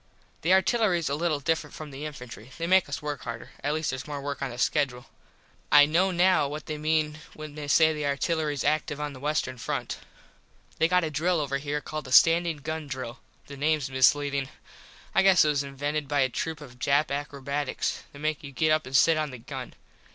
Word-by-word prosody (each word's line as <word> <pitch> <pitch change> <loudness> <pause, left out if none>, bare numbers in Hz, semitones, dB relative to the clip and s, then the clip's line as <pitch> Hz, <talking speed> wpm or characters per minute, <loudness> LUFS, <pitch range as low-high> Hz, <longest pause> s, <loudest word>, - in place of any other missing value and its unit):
The 165 - -1
artillerys 190 -5 +3
a - - +1
little 155 0 0
different 150 0 -2
from 155 -2 -8
the 140 +3 -5
infantry. 125 -5 -10
They 165 - -2
make 185 -2 +4
us 145 - -4
work 145 -2 -4
harder. 115 -1 -7
At 145 +1 0
least 155 -1 -1
theres 130 +1 -6
more 145 -1 -4
work 140 0 -5
on 135 - -1
the 120 - -8
skedule. 130 -2 0 0.7
I 145 -1 +8
know 170 +6 +2
now 180 -4 +3
what 150 +2 -6
they 155 -1 -5
mean 155 0 0 0.2
when 155 -1 -8
they 150 -1 -7
say 160 +2 +5
that - - -1
the 150 -1 -3
"artillerys 150 0 -1
active 150 0 0
on 150 -1 -3
the 130 - -10
western 140 -3 -2
front." - - -3 0.8
They 160 - +4
got 180 +1 +3
a 160 - -2
drill 165 +4 +1
over 140 -2 -1
here 145 +1 -3
called 155 0 -6
the 130 - -9
standin 165 0 +5
gun 155 0 -4
drill. 130 -1 -6 0.3
The 140 - -10
names 150 -2 0
misleadin. 140 +1 +2 0.6
I - - +5
guess 190 -4 +6
it - - +3
was 145 -2 +1
invented 145 +2 -3
by 145 0 +1
a 130 - +2
troop 160 +4 -4
of 125 -4 -12
Jap 140 +3 +2
akrobats. 140 0 -3
They - - -13
make 155 +1 -2
you 140 - -8
get 155 +4 +1
up 155 -2 +1
and 130 +1 +2
sit 165 +4 +5
on 155 -1 -1
the 130 - -8
gun. 115 - -8
150 Hz, 215 wpm, -27 LUFS, 140-155 Hz, 0.8 s, I